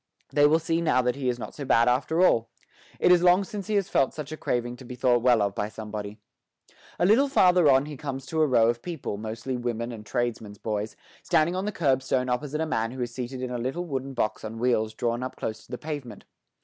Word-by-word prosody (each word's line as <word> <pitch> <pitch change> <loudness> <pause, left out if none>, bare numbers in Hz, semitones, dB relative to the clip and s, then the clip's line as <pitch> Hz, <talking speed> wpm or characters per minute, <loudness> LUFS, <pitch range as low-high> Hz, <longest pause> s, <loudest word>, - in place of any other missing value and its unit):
They 145 +1 +6
will 155 +2 +4
see 165 +1 -1
now 130 -6 +2
that 125 0 0
he 135 -2 -1
is 120 - -1
not 120 - -7
so 145 - -7
bad 115 -3 +3
after 145 +8 +2
all. 115 -9 +2 0.5
It 180 - +4
is 180 -1 +6
long 180 +2 +5
since 200 0 -7
he 215 - 0
has 200 -2 +1
felt 135 - +1
such 150 -1 -6
a - - -3
craving 120 -4 -2
to 130 - -12
be 125 0 -8
thought 125 -1 +2
well 120 -3 +4
of 100 -1 -1
by 105 +1 -2
somebody. 105 -1 -7 0.8
A - - +2
little 230 +9 +5
farther 180 - +5
on 135 +1 +4
he 150 -2 -7
comes 135 -1 -5
to 160 +2 -1
a 155 - +4
row 115 -4 +4
of 120 0 0
people, 165 -12 -5
mostly 110 +4 -4
women 120 -1 -3
and 110 -2 -8
tradesmen's 110 -3 -3
boys, 105 0 -3 0.3
standing 170 0 +2
on 190 +2 -2
the 210 - -1
curb 135 -9 +1
stone 130 -1 0
opposite 145 +5 -2
a - - +1
man 115 -7 -1
who 130 +1 -7
is 120 -1 -6
seated 125 +1 -5
in 125 - -3
a 125 - -3
little 135 +9 -3
wooden 135 -3 -4
box 110 -3 -1
on 110 +1 -6
wheels 110 -2 0
drawn 120 +1 -1
up 130 - -5
close 110 0 -5
to - - -18
the 125 - -3
pavement. 145 -8 -7
130 Hz, 250 wpm, -26 LUFS, 115-155 Hz, 0.8 s, They